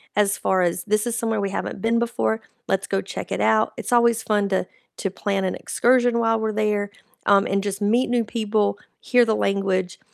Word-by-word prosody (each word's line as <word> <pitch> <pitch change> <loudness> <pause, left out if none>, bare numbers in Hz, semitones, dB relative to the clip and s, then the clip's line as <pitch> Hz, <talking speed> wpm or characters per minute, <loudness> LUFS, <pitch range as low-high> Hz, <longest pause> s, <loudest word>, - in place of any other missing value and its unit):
as 205 -1 +2
far 190 -1 +1
as, 175 0 -1
"This 215 +2 +1
is 235 - -2
somewhere 225 -2 -1
we 200 - -1
haven't 195 - -4
been 230 +2 +1
before, 110 - -1 0.3
let's - - 0
go - - 0
check - - -7
it - - -1
out," 110 0 +2
it's - - -5
always 235 -1 +4
fun 205 -2 +1
to 190 -1 0 0.3
to 195 - -2
plan 195 0 -2
an 185 - -1
excursion 245 -1 +2
while 225 -1 +2
we're 220 0 -1
there, 210 -1 0 0.4
um, 200 0 +5
and 195 0 0
just 200 0 -4
meet 235 +5 +2
new 240 -1 +2
people, 210 -2 0 0.2
hear 245 -1 +4
the 220 -1 +1
language, 190 -2 -1
210 Hz, 205 wpm, -23 LUFS, 195-230 Hz, 0.4 s, um